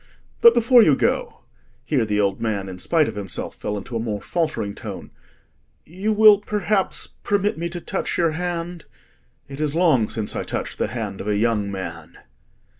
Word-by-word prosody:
But 465 Hz, -, +8 dB
before 240 Hz, +1 st, +6 dB
you 155 Hz, -10 st, +5 dB
go,"—here 110 Hz, -, -2 dB
the 105 Hz, -1 st, 0 dB
old 100 Hz, -1 st, 0 dB
man, 105 Hz, -4 st, -2 dB
in 90 Hz, -1 st, -8 dB
spite 160 Hz, -, +2 dB
of -, -, -4 dB
himself, 100 Hz, -3 st, -4 dB
fell 105 Hz, -, -4 dB
into 110 Hz, +4 st, -7 dB
a -, -, 0 dB
more 110 Hz, -2 st, -3 dB
faltering 155 Hz, -, -2 dB
tone—"you 190 Hz, -, -8 dB
will 215 Hz, -1 st, +7 dB
perhaps 205 Hz, -1 st, -1 dB, 0.2 s
permit 205 Hz, 0 st, 0 dB
me 170 Hz, +1 st, -3 dB
to 175 Hz, 0 st, -5 dB
touch -, -, -3 dB
your 165 Hz, -2 st, +2 dB
hand? 175 Hz, 0 st, -4 dB, 0.6 s
It 140 Hz, 0 st, -9 dB
is 150 Hz, 0 st, 0 dB
long 155 Hz, -11 st, +3 dB
since 110 Hz, -2 st, -3 dB
I -, -, -1 dB
touched -, -, -5 dB
the -, -, +1 dB
hand 95 Hz, -, -5 dB
of -, -, -7 dB
a 105 Hz, -1 st, +1 dB
young 105 Hz, -2 st, +1 dB
man." 95 Hz, -1 st, -7 dB
150 Hz, 175 wpm, -22 LUFS, -, 0.6 s, But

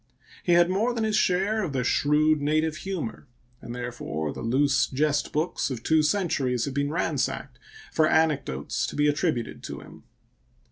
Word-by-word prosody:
He 175 Hz, -, +2 dB
had 175 Hz, 0 st, +6 dB
more 215 Hz, +7 st, 0 dB
than 225 Hz, -, -1 dB
his 215 Hz, -1 st, +1 dB
share 195 Hz, +4 st, +2 dB
of 160 Hz, -8 st, -3 dB
the 130 Hz, -2 st, 0 dB
shrewd 150 Hz, +4 st, +2 dB
native 155 Hz, +2 st, +1 dB
humor, 175 Hz, -10 st, -5 dB, 0.3 s
and 120 Hz, -, -7 dB
therefore 115 Hz, -12 st, -4 dB
the -, -, -7 dB
loose 135 Hz, +4 st, +2 dB
jest 145 Hz, +2 st, 0 dB
books 155 Hz, +1 st, -1 dB
of 120 Hz, -4 st, -5 dB
two 160 Hz, -1 st, +3 dB
centuries 150 Hz, -, 0 dB
have 140 Hz, -, -4 dB
been 140 Hz, +1 st, 0 dB
ransacked 165 Hz, -, -2 dB, 0.3 s
for 155 Hz, -1 st, +4 dB
anecdotes 145 Hz, -, 0 dB
to -, -, -6 dB
be 145 Hz, 0 st, +3 dB
attributed 145 Hz, -4 st, -1 dB
to -, -, -7 dB
him. -, -, -14 dB
150 Hz, 170 wpm, -26 LUFS, 130-170 Hz, 0.3 s, had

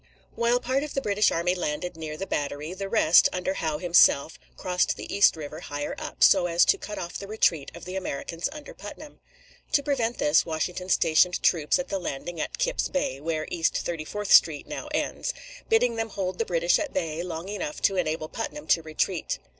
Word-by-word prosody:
While 235 Hz, +1 st, +2 dB
part 260 Hz, +3 st, 0 dB
of 300 Hz, 0 st, -6 dB
the 275 Hz, -, 0 dB
British 210 Hz, -3 st, +2 dB
army 170 Hz, +2 st, +1 dB
landed 180 Hz, 0 st, -3 dB
near 155 Hz, -1 st, -6 dB
the 195 Hz, -, -4 dB
Battery, 145 Hz, 0 st, -3 dB
the 195 Hz, +1 st, -5 dB
rest, 175 Hz, -7 st, +5 dB
under 180 Hz, +1 st, -2 dB
Howe 160 Hz, -5 st, -2 dB
himself, 165 Hz, -3 st, +4 dB, 0.2 s
crossed 180 Hz, -1 st, 0 dB
the -, -, -6 dB
East 200 Hz, -, +5 dB
River 155 Hz, 0 st, -7 dB
higher 145 Hz, -3 st, -5 dB
up, -, -, -2 dB
so 185 Hz, -3 st, +6 dB
as 170 Hz, 0 st, +4 dB
to 400 Hz, -, +3 dB
cut 210 Hz, -, -7 dB
off 175 Hz, -1 st, -5 dB
the 200 Hz, -, -8 dB
retreat 175 Hz, -8 st, +1 dB
of 170 Hz, -, -10 dB
the 185 Hz, +1 st, -6 dB
Americans 170 Hz, -, -3 dB
under 300 Hz, 0 st, -10 dB
Putnam. 290 Hz, +9 st, -11 dB, 0.5 s
To 285 Hz, -, +3 dB
prevent 245 Hz, -5 st, -1 dB
this, 150 Hz, +2 st, +3 dB
Washington 175 Hz, +3 st, -3 dB
stationed 180 Hz, +1 st, +3 dB
troops 155 Hz, -4 st, +3 dB
at 270 Hz, 0 st, -4 dB
the 195 Hz, -, -1 dB
landing 170 Hz, 0 st, -5 dB
at -, -, -4 dB
Kips -, -, 0 dB
Bay 205 Hz, -, -2 dB
(where 155 Hz, 0 st, -2 dB
East 165 Hz, -2 st, +1 dB
Thirty 165 Hz, -3 st, -3 dB
fourth 210 Hz, +5 st, -5 dB
Street 150 Hz, -3 st, +5 dB
now -, -, -6 dB
ends), -, -, -2 dB, 0.3 s
bidding 245 Hz, -, +3 dB
them 225 Hz, 0 st, -2 dB
hold 185 Hz, -3 st, -4 dB
the 225 Hz, -, +1 dB
British 170 Hz, -2 st, +2 dB
at 305 Hz, -, -3 dB
bay 165 Hz, -3 st, -2 dB
long 170 Hz, 0 st, -5 dB
enough 300 Hz, +10 st, -4 dB
to 195 Hz, -, +3 dB
enable 155 Hz, -3 st, -1 dB
Putnam 265 Hz, -, -6 dB
to 165 Hz, -, +4 dB
retreat. 160 Hz, +2 st, -2 dB
180 Hz, 200 wpm, -26 LUFS, 160-210 Hz, 0.5 s, so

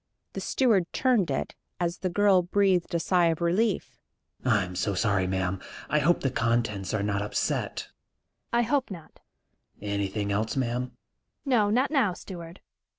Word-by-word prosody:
The -, -, -4 dB
steward 215 Hz, -10 st, +2 dB
turned 240 Hz, -9 st, +2 dB
it, -, -, -2 dB, 0.3 s
as 170 Hz, -1 st, -1 dB
the 185 Hz, -, -1 dB
girl 195 Hz, 0 st, +4 dB
breathed 185 Hz, -1 st, +1 dB
a -, -, +2 dB
sigh 175 Hz, 0 st, +3 dB
of 165 Hz, -1 st, 0 dB
relief. 185 Hz, +5 st, 0 dB, 0.4 s
"I'm 100 Hz, -7 st, +1 dB
so 100 Hz, +2 st, -1 dB
sorry, 95 Hz, -2 st, +1 dB
ma'am. 95 Hz, 0 st, -1 dB, 0.3 s
I 150 Hz, -, +4 dB
hope 170 Hz, +4 st, +3 dB
the 135 Hz, -, 0 dB
contents 115 Hz, -6 st, 0 dB
are 105 Hz, -2 st, -1 dB
not 100 Hz, 0 st, 0 dB
upset." 105 Hz, -, -2 dB, 0.6 s
"I 235 Hz, 0 st, +3 dB
hope 265 Hz, +3 st, 0 dB
not." 175 Hz, -5 st, -10 dB, 0.6 s
"Anything 100 Hz, 0 st, -2 dB
else, 110 Hz, +2 st, -1 dB
ma'am?" 125 Hz, -1 st, -1 dB, 0.5 s
"No, 235 Hz, -7 st, +3 dB
not 255 Hz, +7 st, +2 dB
now, 255 Hz, -, +2 dB
steward? 175 Hz, -1 st, -9 dB
165 Hz, 155 wpm, -27 LUFS, -, 0.6 s, girl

